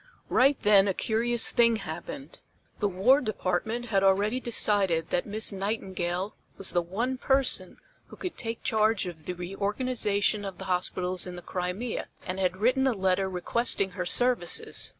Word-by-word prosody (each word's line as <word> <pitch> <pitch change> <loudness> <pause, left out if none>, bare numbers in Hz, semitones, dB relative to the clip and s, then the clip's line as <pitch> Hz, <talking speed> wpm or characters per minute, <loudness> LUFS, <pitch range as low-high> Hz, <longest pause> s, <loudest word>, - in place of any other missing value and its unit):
Right 270 +2 +3
then 205 -1 +5
a 190 - 0
curious 235 +1 +2
thing 235 -2 +4
happened. - - -7 0.4
The 205 - +1
War 230 +10 +4
Department 220 +3 -2
had 195 -3 +2
already 200 +5 +2
decided 200 -9 +1
that 175 - 0
Miss 215 +1 0
Nightingale 190 -2 -3 0.2
was 195 - +1
the 175 - +2
one 235 +9 -3
person 270 0 +1 0.3
who - - -12
could 365 - -6
take 230 -1 -5
charge 220 -2 +2
of 165 -4 -8
the 180 - -3
reorganization 205 +3 -1
of 195 -2 -6
the - - -8
hospitals 180 0 -1
in 180 - -7
the 175 - -9
Crimea, 185 +8 -4 0.2
and 185 +1 -4
had 185 -1 0
written 255 +6 +2
a 260 - +2
letter 190 -1 0
requesting 195 +2 0
her 180 0 -4
services. 245 -4 +2
200 Hz, 160 wpm, -27 LUFS, 185-235 Hz, 0.4 s, then